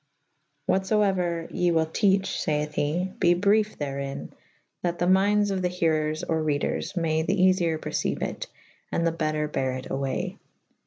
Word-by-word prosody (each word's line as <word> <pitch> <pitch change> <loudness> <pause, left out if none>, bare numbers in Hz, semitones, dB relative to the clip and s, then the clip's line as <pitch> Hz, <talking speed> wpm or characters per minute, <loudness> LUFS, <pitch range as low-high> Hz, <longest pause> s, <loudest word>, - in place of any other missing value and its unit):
what 190 0 +1
fo 210 +1 +3
euer 175 -4 0
ye 180 - +1
wyll 160 -1 +3
teache 195 +3 +1
(fayth 150 0 -1
he) 170 +6 -1
be 175 -1 +4
brief 210 +3 +2
therin 140 -1 -4 0.3
/ - - -45
that 175 -1 -1
the 175 - 0
myndes 200 +2 +3
of 190 -1 -1
the 180 - +1
herers 155 -3 0
or 160 -1 +1
reders 150 +4 -1
may 160 -2 +1
the 190 +5 0
eafiyer 185 -3 +3
perceyue - - -2
it - - -4 0.2
/ - - -34
and 170 - 0
the 165 - +3
better 155 -2 -1
bere 130 -3 -1
it 130 - -8
away. 135 0 -2
170 Hz, 175 wpm, -26 LUFS, 155-190 Hz, 0.3 s, be